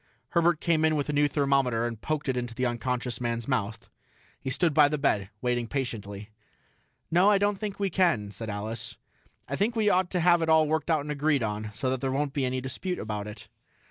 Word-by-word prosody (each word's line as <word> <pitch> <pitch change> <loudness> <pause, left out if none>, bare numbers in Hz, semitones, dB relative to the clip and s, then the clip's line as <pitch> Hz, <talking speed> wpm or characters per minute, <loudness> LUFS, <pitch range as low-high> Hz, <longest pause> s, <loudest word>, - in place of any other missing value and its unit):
Herbert 170 -1 +3
came 160 -1 +2
in 160 0 +3
with 145 -1 -1
a - - 0
new 145 0 +4
thermometer 135 -5 +1
and 115 -2 -4
poked 155 -1 -2
it 130 - +1
into 120 -1 -3
the 125 +1 0
unconscious 120 0 -2
man's 115 -1 -2
mouth. 115 -4 -2 0.5
He - - -4
stood 165 +3 +1
by 150 -1 +6
the 150 +1 -1
bed, 105 -9 +1
waiting 120 -1 0
patiently. 110 -6 -4 0.8
"No, 180 +4 +5
I 205 - +5
don't 205 0 +1
think 205 -2 -4
we 200 -2 0
can," 160 - +2
said 110 +3 -6
Alice. 105 +3 -4 0.5
"I 140 - -2
think 220 +9 0
we 215 -2 +3
ought 185 -1 +2
to 180 - 0
have 175 0 +4
it 160 - 0
all 160 -1 +5
worked 160 +1 -1
out 160 -3 +3
and 150 +1 -5
agreed 145 -2 +1
on, 105 0 -3
so 130 +4 0
there 130 +1 -2
won't 140 +1 -1
be 140 -3 0
any 130 0 -1
dispute 155 +8 -3
about 105 -1 -4
it." 105 +1 -9
135 Hz, 220 wpm, -28 LUFS, 115-160 Hz, 0.8 s, by